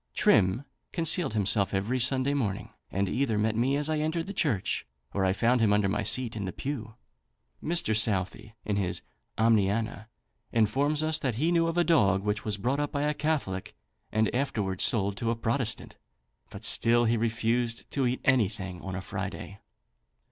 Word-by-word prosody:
Trim 95 +8 +3 0.3
concealed 165 - +1
himself 100 -1 +2
every 110 +7 0
Sunday 130 +2 +2
morning, 110 -9 -2 0.2
and 100 +1 -1
either 120 0 0
met 110 +1 +1
me 130 +5 +1
as 145 +1 0
I 155 -1 0
entered 160 +2 -1
the 200 - -6
church, 145 - 0 0.3
or 100 - 0
I 95 - +3
found 120 +5 +2
him 110 -2 +4
under 105 -1 +3
my 105 +2 0
seat 115 +3 -1
in 105 -3 -3
the 95 - -3
pew. 115 -4 -5 0.7
Mr. 165 -9 +1
Southey, 105 0 -1
in 105 -2 -1
his 90 -3 -2 0.3
"Omniana," 110 0 +1 0.4
informs 140 +7 +2
us 155 0 +2
that 130 -5 -1
he 155 +8 +1
knew 165 -1 +3
of 165 +1 -2
a 175 - +5
dog, 100 - +3
which 105 0 -1
was 105 -2 -2
brought 125 +8 -1
up 145 0 -1
by 145 0 -1
a 150 0 +1
Catholic 140 -12 -2 0.4
and 110 0 +1
afterwards 105 -8 -1
sold 100 -3 +2
to 115 - -1
a 115 - +1
Protestant, 115 0 -2 0.5
but - - -8
still 120 +1 +3
he 115 +1 +2
refused 115 +1 -1
to 135 -3 +1
eat 125 +1 -2
anything 100 -8 +1
on 95 -1 -5
a 90 - -4
Friday. 95 +1 -6
115 Hz, 180 wpm, -28 LUFS, 100-140 Hz, 0.7 s, a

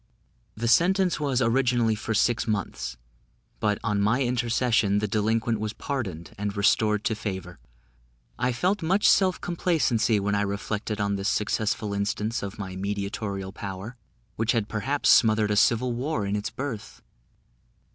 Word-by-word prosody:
The 115 +2 -2
sentence 180 - +3
was 135 -4 +1
originally 120 -1 +2
for 110 +1 -3
six 120 +3 +2
months; 60 - -3 0.6
but 105 -1 +1
on 105 -2 0
my 115 +7 +2
intercession 120 -4 +1
the 105 +1 0
delinquent 110 +2 0
was 110 0 -3
pardoned 100 - -5
and 105 0 -3
restored 105 +1 +2
to - - +1
favour. 95 -5 -5 0.8
I 125 +1 +1
felt 185 - 0
much 190 +5 +2
self 185 -2 +4
complacency 140 - +1
when 100 +1 -1
I 100 - +1
reflected 105 +1 -3
on 100 -1 0
this 95 +1 -1
successful 105 0 -1
instance 105 +3 -1
of 100 -1 -6
my 95 -2 -6
mediatorial 100 0 -3
power, 100 +3 -7 0.4
which 115 +2 +1
had 110 -4 0
perhaps 135 +7 -1
smothered 110 -2 +5
a - - +2
civil 120 +4 +3
war 125 -2 -2
in 100 +1 -1
its 105 +1 -2
birth. 115 -5 -6
110 Hz, 150 wpm, -26 LUFS, 100-120 Hz, 0.8 s, smothered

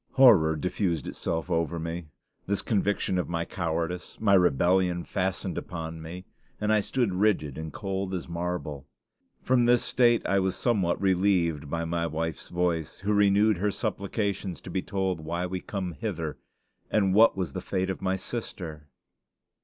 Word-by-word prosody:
Horror 95 -13 +6
diffused 85 -1 -1
itself 85 +2 -3
over 85 0 0
me. 85 0 -4 0.4
This 100 0 0
conviction 100 -3 +1
of 90 - -2
my 85 -1 -1
cowardice, 85 0 -3
my 105 -3 +3
rebellion, 90 +1 +3
fastened 95 -2 -2
upon 80 -2 -6
me, 90 +4 -8 0.3
and 105 +1 +2
I 110 - +5
stood 115 -1 0
rigid 90 -8 +1
and 80 0 -5
cold 95 +2 -3
as 90 - -5
marble. 85 -5 -4 0.6
From 125 -2 +3
this 120 0 +4
state 120 -1 +3
I 100 - +2
was 95 -1 0
somewhat 100 -8 +1
relieved 90 -6 +2
by 85 +2 -2
my 85 0 -1
wife's 80 0 -4
voice, 85 -3 -1
who 105 +2 +1
renewed 105 0 +4
her 105 +2 +1
supplications 100 -2 -2
to 90 - -9
be 95 - 0
told 95 -3 -1
why 85 +3 -2
we 90 0 -4
come 95 -3 -4
hither 85 -5 -4 0.5
and 100 -3 +2
what 110 0 +6
was 90 -7 -2
the - - -4
fate 95 0 -1
of 95 - -6
my 95 0 +1
sister.... 90 -7 -6
90 Hz, 160 wpm, -27 LUFS, 85-100 Hz, 0.6 s, Horror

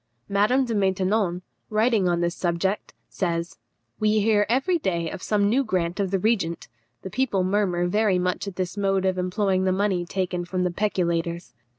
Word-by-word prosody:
Madame 210 +7 +2
de 235 - -3
Maintenon, 190 -2 +1 0.3
writing 215 -3 +2
on 175 0 +1
this 170 0 0
subject, 180 +3 -2
says, 170 - -3 0.4
"We 215 0 +3
hear 210 -1 +3
every 275 +9 +2
day 170 - -1
of 185 - -7
some 205 0 +1
new 255 +6 +2
grant 180 -5 -1
of 195 -2 0
the 195 - +1
regent. 190 -5 0 0.4
The 190 - -6
people 215 -5 +1
murmur 185 -2 +1
very 205 +1 +2
much 180 +2 -1
at 195 - -6
this 185 0 -3
mode 195 -2 +1
of 185 -1 +1
employing 185 +1 0
the 185 - +2
money 190 -2 +1
taken 180 -1 -2
from 180 +1 -2
the 180 - 0
peculators." 170 -3 -1
190 Hz, 180 wpm, -24 LUFS, 180-210 Hz, 0.4 s, We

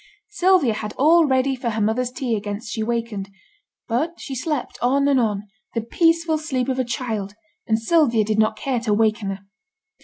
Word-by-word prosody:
Sylvia 370 - +3
had 215 0 -5
all 320 +3 +5
ready 265 0 +2
for 245 -2 -3
her 220 -1 -2
mother's 225 +4 +1
tea 250 -2 -2
against 210 +2 -5
she 220 - -3
wakened; 225 -3 -2 0.6
but 305 +9 -1
she 275 - -6
slept 280 +1 -3
on 275 +3 +2
and 275 -2 +4
on, 210 -4 0 0.3
the 230 - +1
peaceful 330 +6 +2
sleep 265 -4 -2
of 260 0 -1
a - - +2
child, 225 -5 -4 0.3
and 220 - +2
Sylvia 235 -3 +3
did 215 0 0
not 215 0 +2
care 255 +2 -1
to 220 -3 0
waken 215 -1 +1
her. 195 0 -5
240 Hz, 185 wpm, -22 LUFS, 215-275 Hz, 0.6 s, all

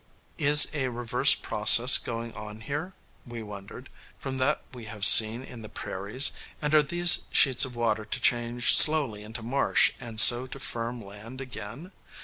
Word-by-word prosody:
Is 145 0 +4
a 135 -4 -4
reverse 120 +3 0
process 115 +4 +3
going 115 0 -8
on 105 0 -12
here, 145 - -7 0.3
we 120 -2 -11
wondered, 100 -1 -13 0.3
from 135 0 -8
that 130 +3 -2
we 120 -3 -12
have 105 -1 -6
seen 115 +3 +4
in 125 -3 -13
the 110 - -12
prairies, 105 +8 -2 0.3
and 150 0 -5
are 155 - +4
these 175 +4 +3
sheets 135 -3 +3
of 125 -2 -10
water 110 -2 -3
to 110 - -7
change 120 0 0
slowly 140 -10 +2
into 110 +2 -10
marsh, 135 +4 -1
and 115 -3 -6
so 120 +2 +5
to 135 - -12
firm 120 -2 -7
land 105 +6 -13
again? 130 - -11
120 Hz, 165 wpm, -24 LUFS, 110-135 Hz, 0.3 s, so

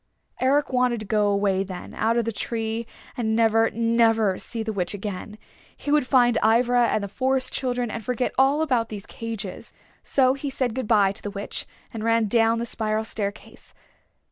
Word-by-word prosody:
Eric 275 +1 +2
wanted 250 -2 +2
to - - -6
go 210 +1 +1
away 200 -1 +1
then, 185 -2 -8
out 230 +1 +1
of 235 - +1
the 230 - -1
tree, 225 +1 -3 0.3
and 220 -2 -1
never, 225 0 +3
never 225 -3 +2
see 230 -2 -3
the 220 0 -3
Witch 185 0 -2
again. 205 +1 -6 0.4
He 290 - -4
would 295 -3 +3
find 245 -3 +4
Ivra 240 +2 +4
and 215 -2 0
the - - -3
Forest 260 +4 0
Children 245 -3 -1
and 225 - -5
forget 250 +1 -1
all 275 +4 +3
about 245 -7 0
these 205 -2 -7
cages. 230 -2 -6 0.3
So 260 -2 +3
he 275 +1 -4
said 260 -3 -1
good 255 -2 -3
by 205 -4 +4
to 200 - -7
the 205 - -4
Witch 200 0 -5 0.3
and 220 -1 -5
ran 230 0 +2
down 225 +1 +3
the 235 - -2
spiral 220 -2 -1
staircase. 205 -2 -6
230 Hz, 190 wpm, -24 LUFS, 215-250 Hz, 0.4 s, find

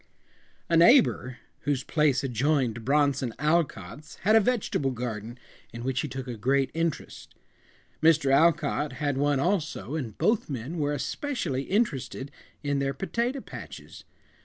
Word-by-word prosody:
A 170 - +2
neighbor 165 - +5 0.2
whose 135 -2 -1
place 150 -3 +1
adjoined 125 -2 0
Bronson 140 -2 +1
Alcott's 150 - -1
had 215 +4 +4
a - - +8
vegetable 210 - 0
garden 120 -2 -5 0.3
in 115 0 -7
which 130 0 -1
he - - -3
took 130 -1 -6
a 120 - -4
great 135 +4 +1
interest. 165 -1 -4 0.7
Mr. 155 -4 +4
Alcott 150 -1 +2
had 145 +1 -1
one 145 0 +1
also, 155 - -1
and 125 -9 -4
both 220 -5 +1
men 140 +5 -4
were 145 -1 0
especially 145 - -3
interested 145 - -1 0.3
in 145 -1 0
their 135 -1 -1
potato 240 - -2
patches. - - -10
140 Hz, 135 wpm, -27 LUFS, 130-165 Hz, 0.7 s, a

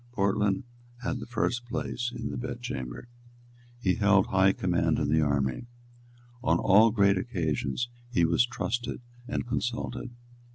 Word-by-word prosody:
Portland 100 0 +1 0.4
had 130 +1 -2
the 115 - -7
first 120 0 -1
place 120 0 -3
in 115 -2 -4
the - - -5
bed 120 0 -4
chamber. 65 - -5 0.7
He 95 -6 +2
held 100 -2 +4
high 95 0 +4
command 90 -2 +1
in 70 - 0
the 80 +1 +3
army. 70 - 0 0.8
On - - +3
all 105 +4 +6
great 100 -3 +3
occasions 85 - -1 0.2
he 85 -9 +3
was 85 +7 +4
trusted 120 0 -3 0.3
and - - -2
consulted. 120 +1 -3
105 Hz, 140 wpm, -28 LUFS, 85-120 Hz, 0.8 s, all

